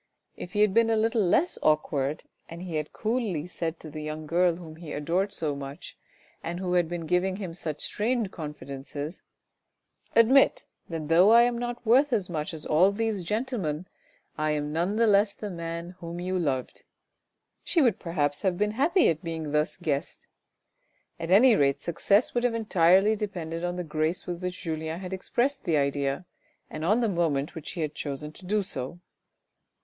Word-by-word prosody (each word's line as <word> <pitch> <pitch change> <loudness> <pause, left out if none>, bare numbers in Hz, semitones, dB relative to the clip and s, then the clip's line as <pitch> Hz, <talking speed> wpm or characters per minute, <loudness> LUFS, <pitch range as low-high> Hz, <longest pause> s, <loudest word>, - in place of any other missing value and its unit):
If 180 - -8
he 210 - +2
had 210 -2 +4
been 230 +1 +4
a 225 - +3
little 225 +1 +2
less 240 - +2
awkward 150 -1 +1 0.3
and 170 +2 -8
he 170 -4 -3
had 150 0 -3
coolly 215 -9 -1
said 165 -2 -4
to 155 - -9
the 155 +1 -6
young 155 +1 -5
girl, 170 +2 +2
whom 160 -2 -10
he 160 -2 -8
adored 175 +7 0
so 150 -6 -2
much 140 0 -8 0.5
and 170 +2 -4
who 180 -1 -2
had 175 -2 +2
been 170 -1 -4
giving 180 +3 +1
him 190 -4 -5
such 160 -3 -5
strange 225 -2 -1
confidences: 145 0 -7 0.5
" - - -35
admit 250 +4 +5 0.2
that 160 -3 -4
though 170 +5 +6
I 235 +1 +8
am 240 0 +1
not 240 0 -4
worth 260 +5 +4
as 185 -5 0
much 155 -2 -2
as 160 -2 -5
all 180 +6 +4
these 215 -2 -1
gentlemen, 200 - -2 0.5
I 155 0 +1
am 150 0 -2
none 175 +6 0
the 230 +1 +4
less 205 -1 +4
the 210 -2 -6
man 170 0 -5
whom 170 0 -6
you 185 +1 -1
loved," 135 -6 -2 0.8
she 345 - +1
would 245 - +3
perhaps 145 -4 -1
have 185 -3 +1
been 210 +1 +1
happy 320 - +3
at 160 +1 0
being 165 -2 -4
at 150 - -5
thus 150 +1 0
guessed; 155 -3 -3 0.9
at 165 0 -4
any 225 +6 +7
rate 140 -4 +2
success 200 - +2
would 240 - 0
have 245 -2 +1
entirely 195 -1 +4
depended 175 -6 -4
on 175 0 -1
the 180 - -3
grace 160 +3 -1
with 175 0 -5
which 180 0 -4
Julien 160 0 -3
had 185 0 -6
expressed 245 +8 -1
the 160 -3 +2
idea, 140 +3 0 0.5
and 155 - -5
on 215 +8 +3
the 230 - +2
moment 160 -7 0
which 160 -3 -7
he 175 - -4
had 155 -1 -2
chosen 150 0 -5
to 180 +4 -13
do 210 +1 +1
so. 135 -1 -5
175 Hz, 190 wpm, -27 LUFS, 155-210 Hz, 0.9 s, I